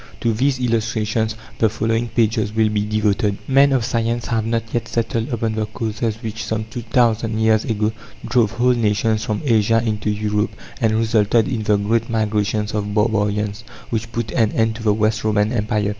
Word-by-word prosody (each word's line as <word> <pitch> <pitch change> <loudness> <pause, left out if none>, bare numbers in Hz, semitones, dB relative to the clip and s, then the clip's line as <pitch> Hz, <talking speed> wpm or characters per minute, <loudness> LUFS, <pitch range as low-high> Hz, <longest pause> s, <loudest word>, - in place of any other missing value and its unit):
To 115 -1 +1
these 130 +4 +1
illustrations 110 -2 0 0.2
the 110 - +4
following 115 +2 -1
pages 110 -2 +1
will 110 0 +2
be 105 0 -1
devoted. 105 -1 +1
Men 140 +1 +5
of 130 -4 +1
science 115 -1 -1
have 110 -2 -1
not 115 -1 0
yet 115 -1 -1
settled 115 +1 -1
upon 115 -3 -1
the 110 -1 -2
causes 110 0 -3
which 110 0 -4
some 110 -1 -2
two 120 - -5
thousand 115 -1 +1
years 110 0 +3
ago 110 -1 0 0.3
drove 115 -2 +2
whole 125 +2 +3
nations 110 -1 +1
from 110 +4 -2
Asia 115 -2 +3
into 105 -1 -1
Europe 105 0 -1 0.3
and 110 -2 +2
resulted 110 0 +2
in 125 -5 -2
the 105 -1 +2
great 110 +3 0
migrations 105 -1 0
of 105 -1 -2
barbarians 105 0 0 0.3
which 115 0 -2
put 115 -2 -3
an 110 -4 +2
end 110 0 +1
to - - -9
the 110 -1 +2
West 110 +1 +1
Roman 105 0 +1
Empire. 105 -2 0
110 Hz, 185 wpm, -20 LUFS, 105-115 Hz, 0.3 s, Men